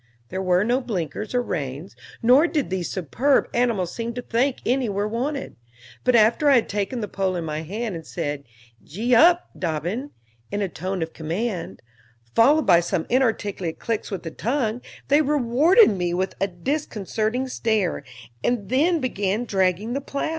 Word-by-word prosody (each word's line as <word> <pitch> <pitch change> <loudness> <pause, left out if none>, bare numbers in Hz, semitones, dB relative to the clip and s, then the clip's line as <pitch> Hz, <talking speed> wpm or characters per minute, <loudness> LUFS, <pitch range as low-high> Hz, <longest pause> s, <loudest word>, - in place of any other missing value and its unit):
There 190 - -3
were 185 0 +3
no 245 +4 +1
blinkers 210 - -4
or 245 - +2
reins, 145 - -5 0.3
nor 260 +8 +6
did 300 - -2
these 185 -2 -2
superb 240 - +1
animals 230 -8 0
seem 235 0 -4
to 245 - -4
think 250 +4 0
any 250 -1 +1
were 200 +1 -1
wanted; 265 +6 -3 0.5
but 250 -1 +3
after 235 +7 +4
I 275 - +6
had 240 - +3
taken 205 +4 -2
the 210 - -3
pole 190 -1 -1
in 170 -2 -3
my 155 0 -3
hand, 210 +6 -4
and 165 -1 -6
said 145 -4 -4 0.4
"Gee 225 +10 -2
up, 345 +8 +5
Dobbin," 175 - -2 0.4
in 205 0 -1
a - - 0
tone 185 +1 -3
of 160 - -7
command, 170 - -4 0.5
followed 290 +7 +5
by 175 -3 +6
some 170 -1 -1
inarticulate 210 -9 0
clicks 225 -2 -3
with 195 -4 -5
the 165 - -5
tongue, 235 - -1 0.3
they 290 +2 +5
rewarded 295 - +4
me 175 -3 -1
with 190 +1 -1
a 195 - +3
disconcerting 220 - -2
stare, 220 - 0 0.4
and 225 -6 -1
then 315 +6 +2
began 210 -2 -1
dragging 195 +2 0
the 275 - -2
plow. 280 +2 -3
220 Hz, 170 wpm, -23 LUFS, 185-250 Hz, 0.5 s, nor